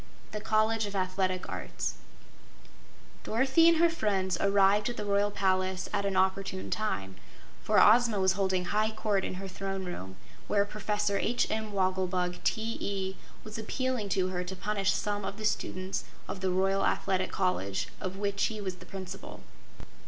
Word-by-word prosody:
The 210 - -4
College 220 0 +2
of 200 - -6
Athletic 185 0 0
Arts - - -3 1.3
Dorothy 265 +8 +4
and 335 - +4
her 340 +1 +6
friends 195 - 0
arrived 200 +2 +4
at 240 - -5
the 210 - -3
Royal 200 0 +2
Palace 185 -2 0
at 200 -1 +1
an 195 - -1
opportune 190 0 0
time, 100 - -2 0.4
for - - +3
Ozma 230 -1 +6
was 190 0 +4
holding 190 -2 0
high 215 +3 +1
court 215 -3 0
in - - -3
her 195 +1 -6
Throne 195 0 -4
Room, 95 - -6 0.3
where 200 -1 +3
Professor 210 -1 -1
H. 240 - +1
M. 220 -1 -2
Wogglebug, 185 -2 0
T.E., 200 -4 -1 0.3
was 215 +1 -7
appealing 250 -1 -2
to 185 -1 +1
her 180 -1 -2
to 185 +1 -5
punish 195 0 0
some 205 -1 -1
of 200 - -4
the 215 - -4
students 185 -2 -1 0.2
of - - -5
the 190 0 0
Royal 195 +2 +2
Athletic 185 -1 +1
College, 180 - 0
of 185 0 -4
which 200 0 0
he 215 -1 -3
was 190 -3 -4
the - - -13
Principal. 190 0 -8
195 Hz, 165 wpm, -30 LUFS, 185-210 Hz, 1.3 s, her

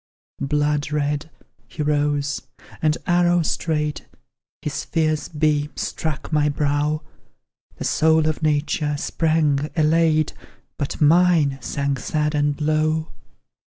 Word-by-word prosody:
Blood 145 +1 0
red, 150 +1 -1 0.4
he 155 - -4
rose, 145 -1 0 0.4
and, 155 0 +2
arrow 175 -1 +3
straight, 150 -1 -2 0.6
His 150 0 -3
fierce 155 -2 0
beams 150 -1 0
struck 155 0 -4
my 150 -1 +3
brow; 145 +1 0 0.7
The - - -6
soul 160 0 +3
of 155 0 -1
nature 150 -1 0
sprang, 150 -2 +1
elate, 155 -1 +3 0.5
But 140 +1 -3
mine 155 -3 +4
sank 140 0 -2
sad 150 +4 -1
and 145 -1 0
low! 155 +1 0
150 Hz, 110 wpm, -22 LUFS, 145-155 Hz, 0.7 s, mine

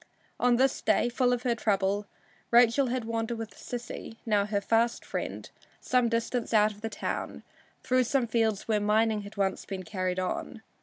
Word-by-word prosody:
On 245 0 +4
this 265 +2 +2
day, - - +2
full 245 +1 +2
of 245 0 0
her 245 -2 +2
trouble, 205 -2 0 0.4
Rachel 240 +3 +5
had 245 -1 -2
wandered 230 +1 -2
with 225 -1 -6
Sissy, 235 -2 -7
now 205 -3 +2
her 210 -1 0
fast 230 +3 +1
friend, - - -4 0.3
some 250 -2 +2
distance 230 0 -1
out 210 0 +5
of 210 0 -14
the 225 - -3
town, - - -4 0.4
through 255 0 +2
some 260 +1 +1
fields 220 -3 0
where 215 -2 +2
mining 215 +1 +2
had 205 +1 -11
once 195 -1 0
been 190 -2 -6
carried 185 0 -2
on. 185 +4 -3
225 Hz, 175 wpm, -28 LUFS, 205-240 Hz, 0.4 s, Rachel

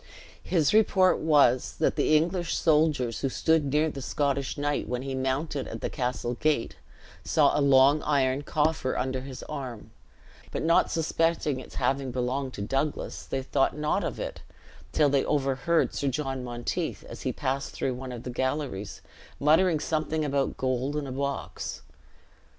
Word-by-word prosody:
His 160 -3 +1
report 195 -4 +4
was, 140 -6 +3
that - - +1
the 155 - +4
English 175 +2 0
soldiers 150 -7 +2
who 135 - 0
stood 160 +3 +2
near 150 +3 +2
the 135 - -7
Scottish 140 0 -1
knight 145 0 -1
when 125 +1 -2
he 135 0 -4
mounted 135 +2 -2
at 115 - -7
the - - -3
castle 125 -1 -2
gate, 145 0 0 0.5
saw - - +3
a - - +2
long 140 +2 +5
iron 135 -2 +1
coffer 150 -2 0
under 130 0 -1
his 130 -1 -8
arm, 125 -5 -7 0.6
but - - -3
not 165 +1 +4
suspecting 165 -3 0
its - - -11
having 135 +1 0
belonged 130 +2 -2
to 100 - -4
Douglas, 135 +7 -2
they 135 0 -2
thought 135 +2 +1
not 150 0 0
of - - -4
it, - - -5 0.5
till 150 - +3
they 140 -1 +2
overheard 140 +3 +1
Sir 140 - -2
John 135 -1 -2
Monteith, 120 -1 -3
as - - -10
he - - -1
passed 135 +2 -2
through 130 - -1
one 130 +1 -7
of 120 -2 -7
the 125 - -5
galleries, 125 -7 -3 0.4
muttering 160 +3 +4
something 155 0 -1
about 140 -1 0
gold 130 +2 -1
and 150 -2 -2
a - - -5
box. 140 +1 -4
140 Hz, 165 wpm, -27 LUFS, 130-150 Hz, 0.6 s, long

